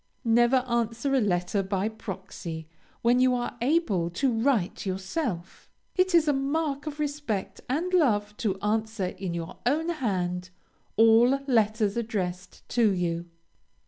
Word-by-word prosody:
Never 240 +3 +4
answer 235 +3 0
a 265 - +4
letter 180 -1 +1
by 195 +1 -1
proxy, 190 -6 -7 0.4
when 240 +2 +4
you 255 0 +4
are 240 0 -3
able 240 - +1
to 245 +9 0
write 225 -5 +1
yourself. 190 - -4 0.3
It 370 -1 +3
is 325 -2 +5
a 295 - +4
mark 285 +1 -1
of 300 0 -5
respect 285 -9 -3
and 335 +8 -1
love, 210 - +2
to 195 -4 -1
answer, 215 -1 0
in 180 -1 -4
your 165 -1 -6
own 310 +7 +1
hand, 185 - -2 0.5
all 225 +2 +6 0.2
letters 220 -4 +2
addressed 185 -5 -4
to 230 -4 +3
you. 175 -2 -1
225 Hz, 140 wpm, -27 LUFS, 190-270 Hz, 0.5 s, all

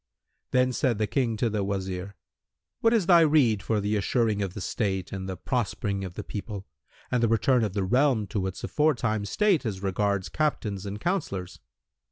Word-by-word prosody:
Then 125 0 +2
said 125 -4 +1
the 110 - +1
King 115 0 0
to 120 - +1
the 105 -2 -1
Wazir, 95 0 -3 0.6
"What 225 - +3
is 225 -6 +3
thy 175 -1 +7
rede 145 -10 +4
for 110 +1 0
the 105 +1 0
assuring 105 0 +1
of 95 -2 -3
the - - -4
state 95 -2 -2
and 95 -1 -5
the 95 - -4
prospering 100 -3 -2
of 90 -2 -7
the - - -5
people 100 -1 -6 0.5
and 125 -2 +2
the 115 - +4
return 115 +2 +3
of 105 -4 -1
the 100 - 0
realm 125 +1 +2
to 100 -4 -1
its 95 - -6
aforetime 120 -9 +1
state 195 - +2
as 100 -5 -4
regards 100 0 0
Captains 105 -10 -2
and 100 +1 -5
Councillors?" 100 - -2
105 Hz, 190 wpm, -27 LUFS, 100-125 Hz, 0.6 s, thy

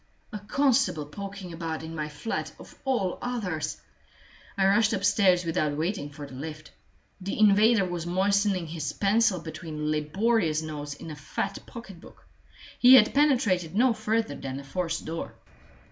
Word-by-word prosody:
A 210 - -4
constable 250 - +1
poking 195 +3 -8
about 160 -1 -4
in 160 0 -7
my 150 -2 -4
flat 150 +10 -4
of - - -13
all 240 -9 0
others! 180 - -3 0.8
I 190 - +3
rushed 205 +3 +4
upstairs 195 -3 +3
without 155 -3 0
waiting 165 -1 -2
for 145 0 -9
the 140 - -12
lift. 155 +3 -8 0.5
The 195 +2 -4
invader 215 0 +5
was 175 -2 -4
moistening 195 0 +1
his 155 -2 -4
pencil 205 -1 +2
between 155 -2 -5
laborious 160 +2 +1
notes 145 -2 -6
in 160 - -9
a - - -6
fat 155 +7 -4
pocketbook; 195 -7 -12 0.5
he 255 +1 +9
had 215 -4 +6
penetrated 215 - +2
no 245 +2 +4
further 225 +1 -1
than 135 -1 -6
the 140 - -7
forced 165 +4 -3
door. 165 +1 -5
180 Hz, 150 wpm, -27 LUFS, 155-210 Hz, 0.8 s, he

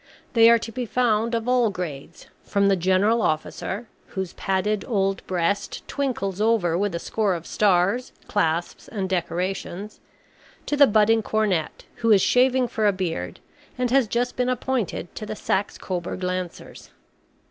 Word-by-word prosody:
They 230 -1 +7
are 235 - +7
to 230 0 -6
be 245 +1 -4
found 230 -1 +1
of 230 +1 -2
all 250 -2 +3
grades, 170 -5 -7 0.2
from 200 0 +1
the 195 - +4
General 190 +6 +2
Officer, 195 +6 -2 0.2
whose 190 -2 -5
padded 195 +2 -1
old 195 -5 0
breast 185 +3 -1
twinkles 210 -9 -2
over 215 -7 +2
with 195 0 0
a - - -2
score 205 -1 0
of 170 -1 -7
stars, 200 +5 +2 0.2
clasps, 170 -4 -1
and 195 -4 -3
decorations, 185 +2 -3 0.7
to 295 - -1
the 285 -1 +7
budding 220 +1 +4
cornet, 205 -7 -1
who 230 -1 +2
is 200 -3 +6
shaving 255 0 +3
for 215 -2 0
a - - +5
beard, 170 - -4 0.4
and 250 -1 0
has 265 -3 +4
just 240 +3 -1
been 250 0 0
appointed 250 -8 -2
to 215 - -7
the 215 - -4
Saxe 200 -1 -1
Coburg 180 0 -4
Lancers. 180 -1 -5
205 Hz, 160 wpm, -24 LUFS, 185-230 Hz, 0.7 s, They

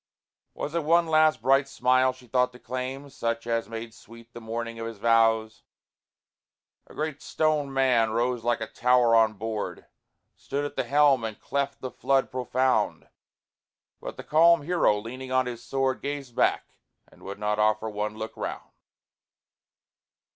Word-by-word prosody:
Was 150 - -5
it 170 -1 -1
one 170 +3 +4
last 155 -5 +3
bright 135 +2 +4
smile 130 -1 +2
she 130 -1 -17
thought 125 +1 +1
to - - -12
claim, 130 +3 -5
Such 115 -1 -3
as 115 -1 -1
made 115 0 -7
sweet 115 +1 -16
the 120 - -9
morning 115 +1 -5
of 115 - -4
his 115 -2 -8
vows? 115 0 +2 1.3
A - - -15
great 155 -2 -3
stone 155 -3 0
man 130 -4 +3
rose 120 +1 -1
like 120 -1 0
a - - -1
tower 125 0 +3
on 110 -1 +4
board, 110 +1 -5 0.5
Stood 145 +1 -4
at 145 - -6
the - - -1
helm 140 -4 +4
and 110 -2 -5
cleft 140 0 -3
the 130 - -5
flood 135 -1 0
profound: 130 +1 0 0.9
But - - -8
the - - -7
calm 165 +1 +4
hero, 170 -10 +2
leaning 130 +5 -7
on 130 0 +2
his 120 -1 -6
sword, 135 0 -1
Gazed 140 -4 -5
back, - - +1 0.3
and - - -22
would 100 +1 -7
not 105 0 -1
offer 110 +1 +2
one 105 0 -4
look 110 0 -6
round. - - -6
125 Hz, 160 wpm, -26 LUFS, 115-135 Hz, 1.3 s, one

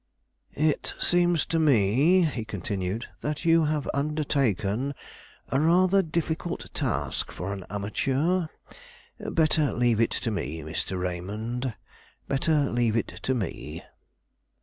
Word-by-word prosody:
"It 155 0 0
seems 175 -2 +3
to 165 - 0
me," 145 - +4
he 140 -8 -1
continued, 100 0 -3
"that 150 +3 -3
you 165 -1 +5
have 150 -1 -1
undertaken 140 - 0 0.5
a 135 - +2
rather 180 +5 +4
difficult 165 0 -3
task - - -2
for 95 +3 -4
an 95 -3 -7
amateur. 135 - 0 0.7
Better 155 -2 +2
leave 120 -2 +2
it 115 - +3 0.2
to 115 - +1
me, 80 -5 -3
Mr. 80 +4 -3
Raymond; 105 +7 -3 0.5
better 145 +1 +1
leave 120 -2 +1
it 115 - -1
to 130 - 0
me." 80 - -4
135 Hz, 120 wpm, -27 LUFS, 105-155 Hz, 0.7 s, you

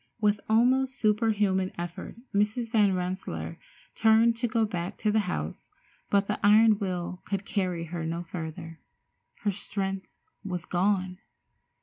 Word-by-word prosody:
With 210 -1 +2
almost 260 +4 +3
superhuman 210 -4 +2
effort 175 +2 -6 0.2
Mrs. 215 +3 0
Van 205 -5 +4
Rensselaer 185 +1 -4 0.3
turned 225 +1 +4
to 240 +1 0
go 225 0 +2
back 180 -1 -4
to 215 - +1
the 220 - +3
house, 75 - -4 0.4
but 200 0 +3
the 210 - -2
iron 215 +1 +6
will 180 -2 -3
could 195 0 -3
carry 180 -5 -1
her 165 0 -5
no 165 +2 -3
further. 165 -1 -7 0.6
Her 210 -3 +1
strength 195 -1 -4 0.4
was 180 -3 -4
gone. 185 0 0
200 Hz, 135 wpm, -28 LUFS, 180-215 Hz, 0.6 s, iron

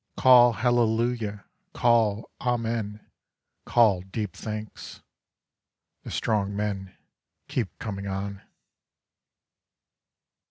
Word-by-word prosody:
Call 120 -2 +7
hallelujah, 115 -2 0 0.3
call 115 -3 +2
amen, 115 -4 -2 0.6
call 110 -6 +4
deep 95 0 -5
thanks. 110 -1 -7 1.0
The - - -9
strong 100 -2 -1
men 100 -2 -3 0.5
keep 115 -7 -3
coming 100 -2 -5
on. 100 0 -4
110 Hz, 75 wpm, -26 LUFS, 100-120 Hz, 1.0 s, Call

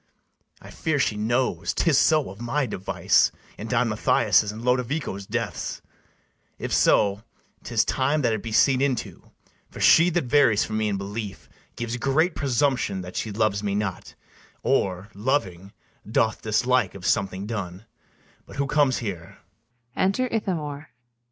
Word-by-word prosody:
I - - -13
fear 160 -2 -1
she 120 -5 +1
knows 120 +5 -1
'tis 165 -5 +2
so 155 -4 +3
of 100 +4 -12
my 135 +4 0
device 95 -5 +1 0.2
In - - -7
Don - - +1
Mathias' 105 - +2
and 110 +2 -9
Lodovico's 125 -5 -1
deaths: - - -4 0.7
If - - -4
so, 100 0 +3 0.4
'tis 115 -2 +1
time 140 +3 0
that 115 -2 +2
it 110 - -2
be 115 - -6
seen 130 +4 +4
into; 135 -4 -2 0.4
For - - -11
she 170 +2 +6
that 175 -1 0
varies 125 -5 +3
from 110 0 -3
me 110 - 0
in 100 -1 -1
belief, 100 0 -6 0.3
Gives 120 +1 -4
great 155 +7 +1
presumption 130 -6 0
that 90 0 -9
she 110 - -3
loves 105 -1 0
me 100 -1 -2
not, 100 -4 -4 0.5
Or, 95 +2 0
loving, 100 -5 -2 0.4
doth 110 0 +1
dislike 120 0 +1
of 95 -2 -9
something 95 0 0
done. 100 -3 -5 0.6
But - - -12
who 140 - 0
comes 140 -2 +2
here? 85 -5 -6
115 Hz, 145 wpm, -24 LUFS, 100-135 Hz, 0.7 s, she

